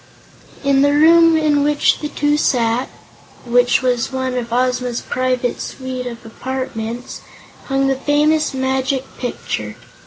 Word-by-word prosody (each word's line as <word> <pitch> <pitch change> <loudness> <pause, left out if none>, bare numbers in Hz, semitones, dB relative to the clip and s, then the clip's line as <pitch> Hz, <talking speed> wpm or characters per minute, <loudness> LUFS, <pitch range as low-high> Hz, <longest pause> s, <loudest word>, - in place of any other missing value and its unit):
In 275 -1 +3
the 285 0 +3
room 330 +2 +6
in 300 -2 +2
which 295 0 +2
the 300 - -3
two 295 0 +1
sat 245 -4 +1 0.6
which 245 +1 +3
was 250 0 0
one 260 -1 -2
of 240 -2 -4
Ozma's 250 0 0
private 255 -1 -1
suite 255 -1 -5
of 235 -1 -8
apartments 245 -1 -5 0.4
hung 270 0 0
the 270 - +2
famous 300 +3 +1
Magic 265 0 -1 0.2
Picture. 245 - -4
260 Hz, 130 wpm, -18 LUFS, 245-290 Hz, 0.6 s, room